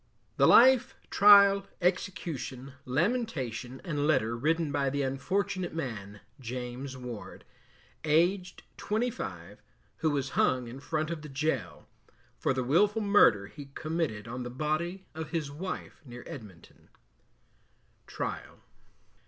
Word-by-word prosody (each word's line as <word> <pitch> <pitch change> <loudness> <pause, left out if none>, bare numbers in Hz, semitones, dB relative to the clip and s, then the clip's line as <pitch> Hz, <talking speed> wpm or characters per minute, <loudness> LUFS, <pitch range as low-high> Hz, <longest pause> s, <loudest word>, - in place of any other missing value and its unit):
The - - +5
Life, 255 0 +6 0.2
Trial, 200 -1 +7
Execution, 170 -7 -2
Lamentation, 130 - -1
and 150 -5 -1
Letter 115 -7 +2
written 155 +4 0
by 140 -1 +1
the 140 +1 -1
unfortunate 175 +6 -2
man 105 -9 -5 0.2
James 125 +2 -6
Ward, 125 -4 -8 0.6
Aged 175 +5 +1
25, 105 - -3 0.4
who 160 - +1
was 140 -2 -1
hung 125 -2 +1
in 120 +3 -8
front 155 +2 -2
of 165 -2 -4
the 150 - -9
Gaol, 150 +4 -2 0.5
For - - +1
the 130 -1 0
Wilful 205 - +3
Murder 125 - +5
he 145 +8 -10
committed 155 -10 -2
on 125 +2 -5
the 120 - -5
body 155 +8 -2
of 160 0 -6
his 155 -5 -3
Wife, 180 +6 -6
near 125 -3 -10
Edminton. 105 - -12 1.2
TRIAL. - - -5
145 Hz, 120 wpm, -29 LUFS, 125-175 Hz, 1.2 s, Trial